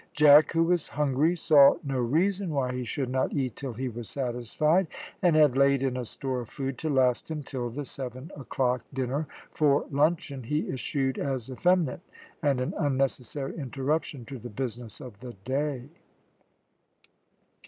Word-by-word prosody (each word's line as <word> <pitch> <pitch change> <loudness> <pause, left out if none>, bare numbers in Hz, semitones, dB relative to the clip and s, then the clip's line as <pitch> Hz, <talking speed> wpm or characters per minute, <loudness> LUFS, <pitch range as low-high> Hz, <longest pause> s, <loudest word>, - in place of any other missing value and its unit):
Jack, 150 +1 +7
who 165 0 +3
was 175 -1 +1
hungry, 150 +3 +1
saw 150 -4 +6
no 135 -3 -2
reason 180 +10 +1
why 135 -4 -1
he 125 0 -3
should 125 +2 -3
not 130 0 0
eat 130 -6 -1
till 135 -3 -5
he 130 +4 -3
was 120 -2 -6
satisfied, 140 - 0 0.3
and 175 -4 +4
had 150 -4 +5
laid 140 0 +4
in 130 -2 0
a 125 -1 -3
store 130 +2 -3
of 115 - -10
food 135 -2 -4
to 160 - -2
last 130 -2 +2
him 155 -2 -4
till 125 -3 -4
the 140 +5 -5
seven 130 +5 -7
o'clock 125 -2 -1
dinner, 135 +3 -2 0.2
for 145 -2 +2
luncheon 145 -1 +1
he 150 +6 -1
eschewed 135 0 -1
as 130 -2 -3
effeminate 175 +2 +1 0.4
and 140 -4 +2
an 125 - -2
unnecessary 135 -1 -1
interruption 140 -1 -2
to 135 +1 -8
the 120 - -8
business 120 -1 -5
of 115 -6 -10
the 125 -1 -8
day. 135 -1 -2
135 Hz, 165 wpm, -28 LUFS, 125-150 Hz, 0.4 s, Jack